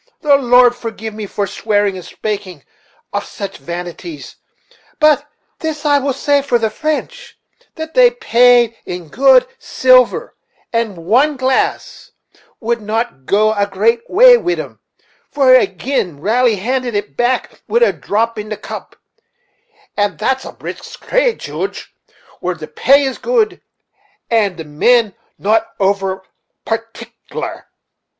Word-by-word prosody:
the 290 -3 +4
Lord 245 -2 +4
forgive 225 -2 -6
me 210 -1 -6
for 200 +1 -2
swearing 205 -1 0
and 185 - -8
spakeing 195 -8 -5 0.5
of - - -1
such 200 - -7
vanities; 175 - -7 0.6
but 300 -1 +3 0.3
this 315 -2 -4
I 290 -1 +4
will 275 0 -1
say 285 +2 +1
for 270 -3 +1
the 220 -2 -1
French, 310 - -4 0.4
that 320 0 -7
they - - +6
paid 245 - +3
in 175 -3 -7
good 255 - +5
silver; 255 -1 +3 0.4
and 230 -5 -1
one 270 - +3
glass 260 0 -1 0.5
would 235 -1 -2 0.4
go 215 +2 +3
a 205 -1 0
great 220 +4 +1
way - - +7
wid 355 -6 -2
'em, - - -8 0.5
for 275 -3 +3
they 255 -5 +6
gin'rally 215 - 0
handed 245 +3 -2
it 205 0 -3
back 245 +1 -1
wid 475 +1 +2
a - - +3
drop 225 +2 -1
in 210 0 -6
the 215 - -4
cup; - - -9 1.0
and 205 -5 0
that's 265 +7 -1
a - - -7
brisk - - -10
trade, - - +1
Joodge, 390 - -6 0.5
where 180 0 -2
the 155 -2 -9
pay 275 - +3
is 265 -2 -3
good, 465 -3 0 0.7
and 205 -6 +1
the 160 - -7
men 215 +9 +2 0.2
not 215 +2 +1
over 195 -1 0 0.4
partic'lar." 230 +1 -6
235 Hz, 135 wpm, -16 LUFS, 205-275 Hz, 1.0 s, way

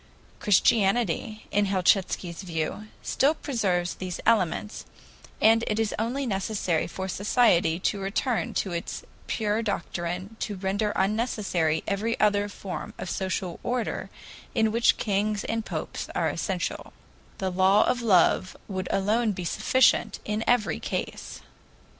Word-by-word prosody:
Christianity, 215 +1 +2
in 205 0 +2
Helchitsky's 185 -2 +1
view, 170 +3 -3 0.2
still 285 +4 +2
preserves 190 - -1
these 185 -2 -5
elements, 210 -1 +1 0.6
and 225 +1 +5
it 215 0 0
is 220 -2 0
only 250 +5 -1
necessary 195 -5 -1
for 190 0 -5
society 190 -4 +3
to 200 - 0
return 210 +5 -1
to 190 - -1
its 170 -1 -4 0.2
pure 215 0 0
doctrine 185 0 -3
to 210 - -3
render 200 +3 -1
unnecessary 195 -6 0
every 210 +3 -1
other 205 -1 +2
form 195 -2 -7
of 175 - -5
social 185 -2 -3
order 245 -1 -2 0.5
in 220 -1 +3
which 230 +1 +3
kings 205 0 0
and 225 0 -2
popes - - -5
are - - +1
essential; - - -3 0.4
the 190 -1 -2
law 190 +3 +5
of 250 -1 0
love 185 -3 +3
would 190 -2 -3
alone 215 +3 +1
be 180 -1 -5
sufficient 260 +9 +3
in 210 +1 -1
every 245 -3 +2
case. - - -5
205 Hz, 130 wpm, -26 LUFS, 185-225 Hz, 0.6 s, and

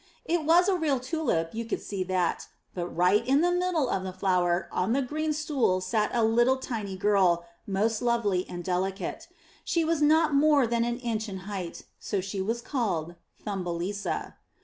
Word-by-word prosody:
It 335 -2 0
was 345 +4 +5
a 395 - +3
real 300 -6 +1
tulip, 255 - -1
you 230 +1 -3
could 230 - -3
see 195 -2 -4
that; 180 -2 -1 0.3
but 175 -1 -3
right 180 +4 +2
in 275 +3 +3
the 350 +1 +3
middle 355 -5 +1
of 195 - -1
the 190 0 -4
flower 180 -1 +1
on 190 +5 0
the 275 - +2
green 310 +4 -2
stool 295 - +1
sat 210 +3 0
a 235 -2 +1
little 240 +4 +3
tiny 215 -7 -5
girl, 185 -4 +3 0.2
most 210 +3 0
lovely 230 -7 +1
and 175 0 -6
deli 185 +2 0
cate. 220 - -6 0.4
She 335 -2 +1
was 325 -1 0
not 310 +1 +4
more 285 -1 +5
than 235 0 +1
an 240 0 -1
inch 225 -3 -3
in 190 -2 -6
height, 190 -4 -5 0.2
so 200 - -2
she 195 +1 -3
was 230 +5 -2
called 180 - -2 0.3
Thumbelisa. 190 0 -3
220 Hz, 185 wpm, -28 LUFS, 185-280 Hz, 0.4 s, was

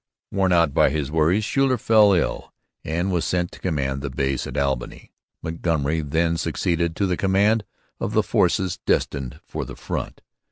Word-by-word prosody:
Worn 95 -2 +1
out 85 -5 +3
by - - +4
his 75 -1 -2
worries, 80 +7 +2
Schuyler 135 0 +2
fell 110 -2 +5
ill 85 - -1 0.3
and 85 +5 -1
was 85 -2 0
sent 90 -1 -1
to - - -13
command 70 -6 -2
the 70 - -3
base 65 0 -1
at 65 - -6
Albany. 70 -3 -2 0.3
Montgomery 80 -2 -1
then 80 +3 0
succeeded 85 0 -1
to 100 - 0
the 90 -2 0
command 100 +4 +2 0.4
of - - -3
the - - +3
force 95 -2 +1
destined 70 -3 -1
for - - -4
the - - -8
front. - - -5
85 Hz, 170 wpm, -23 LUFS, 70-95 Hz, 0.4 s, fell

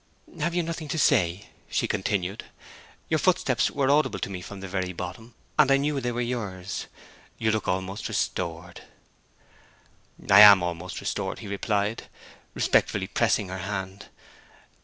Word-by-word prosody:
'Have 170 +3 -1
you 175 - +1
nothing 165 -1 -5
to 160 - -3
say?' 90 - +2 0.2
she - - 0
continued. 95 -1 -2 0.6
'Your - - +1
footsteps - - +2
were 140 -1 +1
audible 150 +2 +2
to - - -4
me 90 -2 -5
from 100 +2 -9
the 95 - -7
very 90 -1 -3
bottom, 95 +7 -8 0.2
and 145 -3 +6
I 135 - +5
knew 140 0 -1
they 120 0 -1
were 120 +1 -2
yours. 100 -6 -4 0.5
You 110 -1 +1
look 110 -1 -2
almost 95 +3 -2
restored.' 85 -1 -3 1.5
'I 100 0 +7
am 100 -3 +10
almost 85 +1 -4
restored,' - - -3
he - - -9
replied, 100 +2 -2 0.5
respectfully - - +2
pressing 95 - 0
her 95 +1 -5
hand. 95 +1 -5
100 Hz, 150 wpm, -26 LUFS, 95-120 Hz, 1.5 s, am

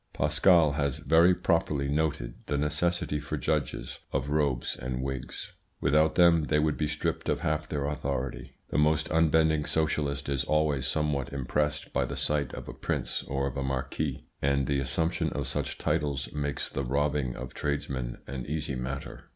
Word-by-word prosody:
Pascal 85 -5 +4
has 70 -2 0
very 85 +3 +5
properly 75 -6 +1
noted 70 -5 0
the 75 - 0
necessity 75 +1 0
for 75 - -4
judges - - -2
of 65 +2 -1
robes 70 -5 +1
and 65 +1 -3
wigs. 65 -2 -5 0.3
Without 75 +2 +3
them 85 -3 +6
they 75 - +2
would 75 0 +2
be 75 - 0
stripped 80 +2 -2
of - - 0
half 75 0 -1
their 70 -2 -1
authority. 70 -3 -3 0.2
The - - +2
most 75 0 +2
unbending 80 -1 +3
socialist 75 -3 0
is 70 -1 0
always 75 -3 +1
somewhat 70 -2 0
impressed 75 +3 -1
by - - +2
the - - -5
sight 75 -3 0
of - - -8
a - - -6
prince - - -2
or 70 0 -1
a 70 +1 -4
marquis; 65 +1 -2 0.2
and 70 -1 +2
the 70 +1 +1
assumption 75 +6 0
of - - -2
such - - -2
titles 70 -3 -1
makes 70 -2 -2
the 70 - -3
robbing 70 -1 0
of 65 - -7
tradesmen 70 -4 -2
an 65 -2 -5
easy 75 -1 -2
matter. 65 +2 -5
75 Hz, 165 wpm, -29 LUFS, 70-75 Hz, 0.3 s, them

